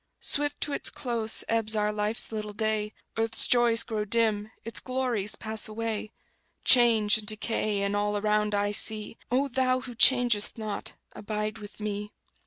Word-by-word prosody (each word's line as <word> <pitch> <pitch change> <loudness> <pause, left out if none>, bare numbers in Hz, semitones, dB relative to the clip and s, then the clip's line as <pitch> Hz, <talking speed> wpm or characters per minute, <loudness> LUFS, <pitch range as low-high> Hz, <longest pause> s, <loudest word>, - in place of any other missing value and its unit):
Swift 290 0 0
to 290 - -1
its - - 0
close 230 -3 -1
ebbs 225 -1 0
our 210 0 0
life's 210 +2 +1
little 210 -1 -5
day; 215 0 -1 0.3
Earth's 225 0 +4
joys 235 -2 +4
grow 215 -2 -3
dim, 215 -1 +1
its 230 - -1
glories 250 -6 -2
pass 220 -1 +1
away; 220 -1 -4 0.5
Change 225 -4 +4
and 210 - -10
decay 215 -1 -1
in 200 0 -1
all 205 0 0
around 210 0 0
I 205 0 0
see; 215 +1 +1
O 265 +3 +1
Thou 255 0 0
Who 250 -1 -8
changeth 240 -3 +4
not, 215 -2 -6 0.2
abide 215 +1 -4
with 205 0 -11
me! 210 0 -5
215 Hz, 160 wpm, -27 LUFS, 210-230 Hz, 0.5 s, Earth's